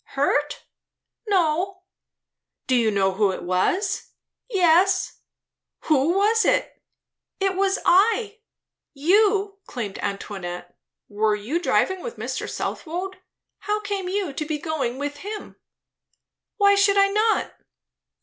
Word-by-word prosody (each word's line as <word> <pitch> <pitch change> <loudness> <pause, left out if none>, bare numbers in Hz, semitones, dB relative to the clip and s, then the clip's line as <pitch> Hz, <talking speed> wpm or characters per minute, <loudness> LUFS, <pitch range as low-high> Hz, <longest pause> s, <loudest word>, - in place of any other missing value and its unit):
"Hurt?" 290 +1 0 0.6
"No." 370 0 0 0.8
"Do 260 - 0
you 230 -3 +3
know 195 -2 +2
who 200 +1 +2
it 185 - -6
was?" 355 - -1 0.4
"Yes." 370 -1 +3 0.6
"Who 305 +2 +2
was 440 +3 +3
it?" - - 0 0.6
"It 390 -1 0
was 390 +1 +1
I." 420 +3 +3 0.6
"You?" 395 +5 +2
exclaimed 210 -5 -6
Antoinette. 185 -3 -5 0.3
"Were 210 +1 +1
you 225 +11 -2
driving 375 +1 +1
with 480 +3 -7
Mr. - - -4
Southwode? 370 +3 -4 0.4
How 420 0 -1
came 400 -3 -3
you 380 -6 -2
to 305 - -3
be 305 0 -3
going 290 -5 -3
with 290 +1 -4
him?" 415 +6 -8 1.0
"Why 400 -1 +5
should 400 0 +3
I 395 0 +5
not?" 430 +2 +1
360 Hz, 120 wpm, -23 LUFS, 265-400 Hz, 1.0 s, Why